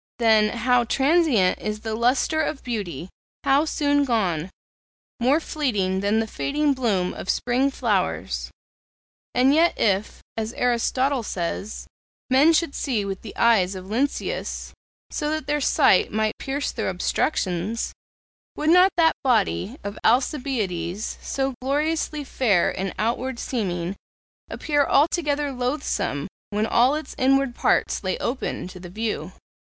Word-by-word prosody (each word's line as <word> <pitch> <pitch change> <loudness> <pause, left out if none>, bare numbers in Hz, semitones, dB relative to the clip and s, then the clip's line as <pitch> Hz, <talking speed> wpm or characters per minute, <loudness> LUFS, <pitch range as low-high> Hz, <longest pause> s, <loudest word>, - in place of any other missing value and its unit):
Then, 220 -1 +3
how 245 +1 +3
transient 270 - +3
is 215 0 -4
the 220 -1 -4
lustre 250 +7 +2
of 310 -2 -3
beauty! 190 - -4 0.3
how 280 +3 +3
soon 285 -2 +1
gone! 190 - 0 0.7
more 260 +6 +3
fleeting 210 - -1
than 205 +3 +1
the 225 - 0
fading 285 +6 0
bloom 210 -9 0
of - - -8
spring 250 +3 +1
flowers. 180 - -1 0.9
And 255 +3 +4
yet 335 +3 +3
if, 200 0 0
as 225 +1 -3
Aristotle 250 +2 +1
says, 195 +1 -4 0.5
men 280 +5 +6
should 330 -2 +1
see 230 -8 -1
with 195 -1 -5
the 215 - -10
eyes 200 -5 +3
of 185 0 -7
Lynceus, 245 +8 -2 0.4
so 300 -1 -2
that 310 0 -2
their 295 0 0
sight 195 - +4
might 215 0 0
pierce 280 +1 -2
through - - -2
obstructions, 200 - -1 0.6
would 305 +1 +1
not 360 +2 +7
that 325 -1 +5
body 235 -1 +1
of 200 0 -6
Alcibiades, 220 - 0
so 270 0 -2
gloriously 300 +2 -1
fair 220 -10 +2
in 190 0 -3
outward 240 +3 -1
seeming, 185 -8 -3 0.5
appear 290 -2 +1
altogether 295 0 +1
loathsome 250 - -2 0.2
when 210 +1 0
all 245 +5 +3
its 310 - -6
inward 270 0 +3
parts - - +1
lay 185 - -1
open 245 -6 -3
to 185 - -11
the 175 0 -9
view? 215 +4 -3
240 Hz, 135 wpm, -24 LUFS, 205-280 Hz, 0.9 s, not